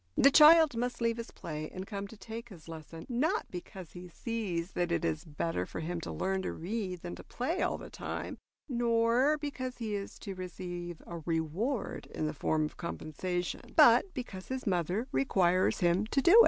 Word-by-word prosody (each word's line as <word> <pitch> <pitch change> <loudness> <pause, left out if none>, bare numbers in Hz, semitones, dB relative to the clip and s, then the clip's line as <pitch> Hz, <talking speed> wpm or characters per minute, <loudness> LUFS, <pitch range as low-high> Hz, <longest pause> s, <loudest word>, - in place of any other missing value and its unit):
The 275 - +7
child 310 -1 +8
must 245 +1 -1
leave 230 -1 +1
his 230 - -5
play 155 -1 -6
and 185 +1 -6
come 200 -1 -5
to 225 - -12
take 230 +3 -7
his 170 -6 -13
lesson, 165 0 -8
not 260 +5 +1
because 180 -1 -8
he 180 0 -9
sees 195 -4 -3
that 175 -1 -1
it 170 - +1
is 80 -2 -1
better 150 - -2
for - - -6
him 170 +2 -3
to - - -5
learn 190 0 0
to - - -3
read 185 0 -3
than 175 - -5
to - - -10
play 320 +9 -2
all - - +1
the - - -10
time, - - -5 0.3
nor 240 +3 +3
because 265 -4 -4
he 220 -3 -3
is 200 -1 -4
to 200 - -6
receive 175 -2 -6
a 170 -1 -6
reward 170 - -1
in 155 - -3
the 155 - -1
form 155 +1 +1
of 150 - -7
compensation, 175 +2 -3
but 390 - +7
because 195 -7 -6
his 260 0 -3
mother 185 +5 0
requires 180 +8 +3
him 175 +4 +3
to 275 - +1
do 340 +6 +5
it. 430 - +10
190 Hz, 195 wpm, -32 LUFS, 170-235 Hz, 0.3 s, it